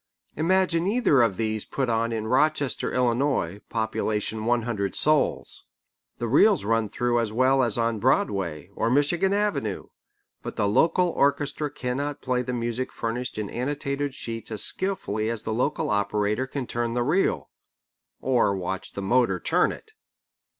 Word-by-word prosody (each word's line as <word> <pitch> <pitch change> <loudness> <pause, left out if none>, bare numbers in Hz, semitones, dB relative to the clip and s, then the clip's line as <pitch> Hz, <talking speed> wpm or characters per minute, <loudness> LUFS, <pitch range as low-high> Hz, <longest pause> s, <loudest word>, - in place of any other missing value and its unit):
Imagine 175 +1 +2
either 200 - +3
of 110 -6 +2
these 110 -1 -1
put 135 -2 -2
on 115 0 0
in 110 -1 -2
Rochester, 140 +3 +1
Illinois, 120 - 0
population 110 -1 -2
one 120 0 +2
hundred 100 -5 -2
souls. 155 0 +2 0.5
The 120 - -3
reels 180 - +4
run 115 0 +1
through 120 +2 0
as 115 -2 -1
well 130 +4 +3
as 120 -4 +2
on 115 -1 0
Broadway 95 - 0
or 115 - 0
Michigan 160 +9 +2
Avenue, 200 - -1 0.5
but - - -6
the 100 - +1
local 170 - +3
orchestra 145 0 0
cannot 140 +1 -3
play 125 -1 0
the 125 0 -4
music 120 +1 -2
furnished 115 +1 -4
in 105 -1 -2
annotated 140 +2 -2
sheets 115 -3 -5
as 110 -2 -1
skilfully 110 - -1
as 115 -2 -2
the 110 - -2
local 130 +6 0
operator 105 +4 0
can 135 -1 -4
turn 120 0 -2
the 120 0 0
reel 165 +10 0 0.7
(or 125 -6 +2
watch 95 +1 -4
the 100 - -5
motor 105 -3 +2
turn - - +2
it!). - - -11
120 Hz, 155 wpm, -25 LUFS, 110-145 Hz, 0.7 s, reels